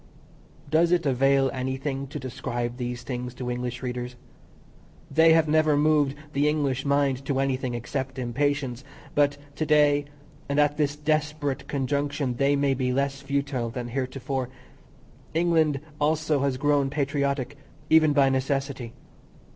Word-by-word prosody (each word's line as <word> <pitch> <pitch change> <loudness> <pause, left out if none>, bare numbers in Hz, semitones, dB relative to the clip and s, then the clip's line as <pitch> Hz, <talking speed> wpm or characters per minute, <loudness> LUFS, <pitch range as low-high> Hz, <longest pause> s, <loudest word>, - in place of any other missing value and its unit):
Does 165 +3 +3
it 175 -2 +2
avail 135 0 +3
anything 135 +1 -3
to 140 - -6
describe 120 -2 -4
these 125 -1 -4
things 125 -1 -5
to 125 0 -4
English 125 0 -4
readers? 125 0 -4 1.0
They 160 0 +6
have 160 -1 +4
never 155 -1 +3
moved 145 -2 +3 0.2
the 145 +2 +2
English 140 -4 0
mind 140 -2 +1
to 135 -2 0
anything 130 -2 -1
except 130 +3 -4
impatience, 130 +1 -1 0.3
but 145 -1 +2 0.2
to - - 0
day 145 -1 +4 0.4
and 140 +1 +1
at 145 0 +3
this 145 -2 +1
desperate 150 -2 -1
conjunction 140 -1 -1
they 140 +2 +3
may 140 -1 +2
be 130 -1 -1
less 140 +1 -1
futile 140 -3 -2
than 120 +1 -5
heretofore. 130 0 -3 0.9
England 160 -4 +2 0.2
also 155 0 +1
has 135 -1 0
grown 145 -1 +2
patriotic, 140 -2 -1 0.4
even 160 -1 +6
by 140 -2 +4
necessity. 135 -2 -2
140 Hz, 140 wpm, -26 LUFS, 130-145 Hz, 1.0 s, They